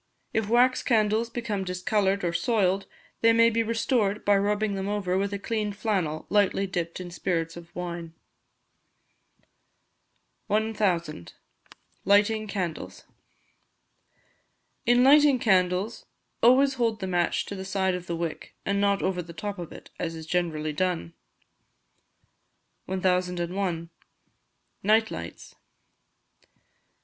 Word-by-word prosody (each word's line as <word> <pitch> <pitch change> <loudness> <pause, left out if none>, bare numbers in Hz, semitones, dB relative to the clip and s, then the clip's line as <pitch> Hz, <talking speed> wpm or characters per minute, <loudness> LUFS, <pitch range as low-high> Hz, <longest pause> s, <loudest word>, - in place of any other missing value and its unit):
If 220 -2 0
wax 250 +2 +4
candles 220 -1 +2
become 230 -4 -3
discoloured 195 +1 0
or 170 -1 0
soiled, 195 -3 +1 0.3
they 230 0 +5
may 230 0 +5
be 230 +1 +1
restored 225 -2 0
by 205 - +5
rubbing 205 +1 +1
them 195 0 -3
over 200 -3 -1
with 200 +1 0
a 200 - -2
clean 210 0 -2
flannel 190 -7 -2
slightly 200 -1 +2
dipped 175 -3 -3
in 180 -1 -7
spirits 165 -2 -2
of 170 -1 -11
wine. 170 -2 -5 2.3
1000. 200 - -1 0.7
Lighting 210 +2 +3
Candles. 185 -5 -4 1.8
In 245 +1 +5
lighting 290 0 +6
candles 190 0 +1 0.3
always 265 +3 +5
hold 230 -4 0
the 190 - -3
match 175 -2 0
to - - -7
the 190 - -6
side 190 -1 0
of 180 0 -5
the 170 - -2
wick, 165 -2 -5
and 200 0 0
not 200 -1 +2
over 185 -1 0
the 170 0 -10
top 200 +4 -5
of 170 - -7
it, - - -12
as 165 -1 -3
is 160 -1 -8
generally 155 -3 -1
done. 170 0 -1 1.7
1001. 180 -2 -1 0.9
Night 220 +2 +3
Lights. - - -8
195 Hz, 120 wpm, -26 LUFS, 180-220 Hz, 2.3 s, lighting